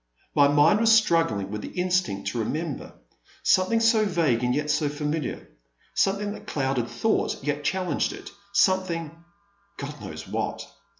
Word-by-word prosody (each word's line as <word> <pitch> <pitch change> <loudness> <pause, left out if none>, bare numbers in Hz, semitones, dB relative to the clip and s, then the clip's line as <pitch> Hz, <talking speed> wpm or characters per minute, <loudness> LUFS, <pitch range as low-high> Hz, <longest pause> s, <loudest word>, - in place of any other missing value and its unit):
My 145 -1 +5
mind 145 +8 +4
was 225 0 +4
struggling 165 - +3
with 105 0 -4
the 180 - -7
instinct 180 - 0
to 115 - -4
remember. 150 +6 -3 0.5
Some 185 0 +4
thing 230 - +2
so 225 -1 +4
vague 165 - +1
and 125 0 +1
yet 150 0 0
so 150 0 +1
familiar 150 0 -3 0.3
— - - -48 0.2
something 200 +1 +1
that - - -10
eluded 135 -3 0
thought 220 - 0
yet 145 +1 -2
challenged 180 -1 0
it, - - -9 0.2
something 185 -5 +1 0.3
— 200 0 -40
God 145 0 -7
knows 80 0 -8
what - - -3
160 Hz, 165 wpm, -25 LUFS, 140-195 Hz, 0.5 s, My